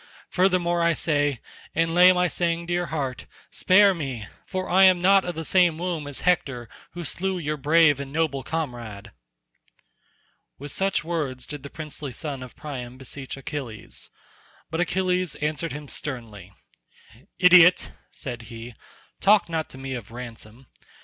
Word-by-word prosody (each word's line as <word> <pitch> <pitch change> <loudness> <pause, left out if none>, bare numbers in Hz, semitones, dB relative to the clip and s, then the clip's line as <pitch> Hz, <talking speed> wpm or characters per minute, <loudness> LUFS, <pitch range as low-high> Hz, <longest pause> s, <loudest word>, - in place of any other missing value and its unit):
Furthermore 180 -2 +2
I 170 0 +3
say, 145 -5 0 0.3
and 165 0 +1
lay 180 +1 +8
my 180 0 +2
saying 170 -1 -1
to 175 - -2
your 175 0 0
heart, 135 -5 -4 0.2
spare 200 +1 +5
me, 135 -10 -5 0.2
for 185 -1 -3
I 190 +2 +5
am 185 -1 +6
not 190 +2 +4
of 175 -2 -4
the 160 0 -5
same 175 -3 +3
womb 170 -4 -3
as 145 - -5
Hector 135 -9 0 0.3
who 175 0 -6
slew 190 +4 0
your 150 -3 -2
brave 150 0 +4
and 140 -1 -6
noble 150 -3 0
comrade." 120 -10 -5 1.5
With 145 +1 -6
such 195 +1 0
words 150 -6 -3
did 145 -2 -6
the 140 - -9
princely 150 -3 -7
son 140 +1 -5
of 125 -1 -10
Priam 130 -4 -7
beseech 135 +1 -7
Achilles; 130 -6 -6 0.6
but 165 - -2
Achilles 180 -1 0
answered 155 +2 -2
him 150 0 -7
sternly. 115 - -5 0.9
"Idiot," 180 -1 +6 0.2
said 125 -5 -7
he, 115 0 -9 0.5
"talk 205 -2 +4
not 160 -1 -2
to - - -9
me 135 0 -5
of 120 -5 -6
ransom. 120 0 -10
155 Hz, 155 wpm, -25 LUFS, 130-175 Hz, 1.5 s, lay